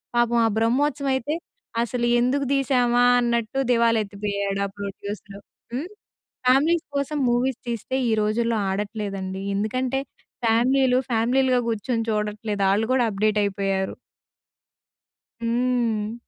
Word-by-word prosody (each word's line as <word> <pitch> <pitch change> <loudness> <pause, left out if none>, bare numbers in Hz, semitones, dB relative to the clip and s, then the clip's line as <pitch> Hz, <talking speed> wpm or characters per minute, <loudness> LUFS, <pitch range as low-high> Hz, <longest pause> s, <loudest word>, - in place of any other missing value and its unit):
పాపం 240 0 +3
ఆ - - +4
బ్రహ్మోత్సవం 275 +5 +1
అయితే 265 +4 -1 0.5
అసలు 240 0 -1
ఎందుకు 270 +3 +1
తీసామా 245 -3 +2 0.2
అన్నట్టు 235 +1 0
దివాల 230 -1 +4
ఎత్తిపోయాడు 200 -1 -3
ఆ - - -10
ప్రొడ్యూసరు. 200 0 -7 0.3
హ్మ్, 295 +8 -3 0.6
ఫ్యామిలీస్ 310 +6 +4
కోసం 285 +2 -1
మూవీస్ 245 +1 0
తీస్తే 235 +3 -2
ఈ - - +2
రోజుల్లో 225 +1 +1
ఆడట్లేదండి. 195 -2 -4
ఎందుకంటే 255 +5 -1 0.5
ఫ్యామిలీలు 250 +3 +3
ఫ్యామిలీలుగా 250 +2 +2
కూర్చొని 225 +1 -1
చూడట్లేదు. 210 -1 -1
ఆళ్ళు 220 +2 +1
కూడా 245 -3 +3
అప్డేట్ 210 +1 +1
అయిపోయారు. 195 -1 -1 1.5
హ్మ్. 230 -2 0
235 Hz, 110 wpm, -24 LUFS, 210-255 Hz, 1.5 s, ఆ